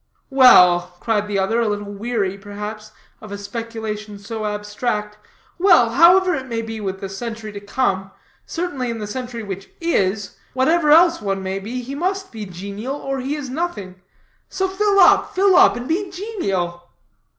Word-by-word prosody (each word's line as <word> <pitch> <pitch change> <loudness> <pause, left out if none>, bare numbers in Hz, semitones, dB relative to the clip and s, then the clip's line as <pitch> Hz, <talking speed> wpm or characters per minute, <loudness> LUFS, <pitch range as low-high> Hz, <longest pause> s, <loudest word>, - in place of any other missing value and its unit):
"Well," 180 -9 +6
cried 210 -1 0
the 205 -1 -1
other, 195 +4 +1
a 230 - +1
little 205 -1 -3
weary, 205 -2 -2
perhaps, 210 +2 -8 0.3
of 215 - -11
a 200 - -4
speculation 215 0 -6
so 215 +2 -5
abstract, 210 0 -3 0.4
"well, 340 -11 +5
however 360 +7 +6
it 265 -4 -4
may 230 -2 -3
be 225 -1 -6
with 190 -1 -4
the 195 - -4
century 220 +2 -6
to 205 - -7
come, 200 -2 -1 0.4
certainly 290 -8 -3
in 230 - -3
the 215 - -5
century 240 +1 -5
which 195 -1 -7
is, 205 - -1 0.2
whatever 300 +4 +2
else 335 0 +6
one 195 -2 -2
may 190 +1 -3
be, 240 +6 -5
he 265 +3 -7
must 380 +6 -2
be 215 -3 -7
genial 200 +8 -6
or 275 -2 -4
he 270 +3 -2
is 280 -4 -6
nothing. 205 - -4 0.5
So 380 - -1
fill 400 +1 +1
up, 365 - +5
fill 385 0 +4
up, - - +6
and 240 +1 -6
be 370 +5 -1
genial!" 195 - -3
225 Hz, 175 wpm, -20 LUFS, 200-280 Hz, 0.5 s, Well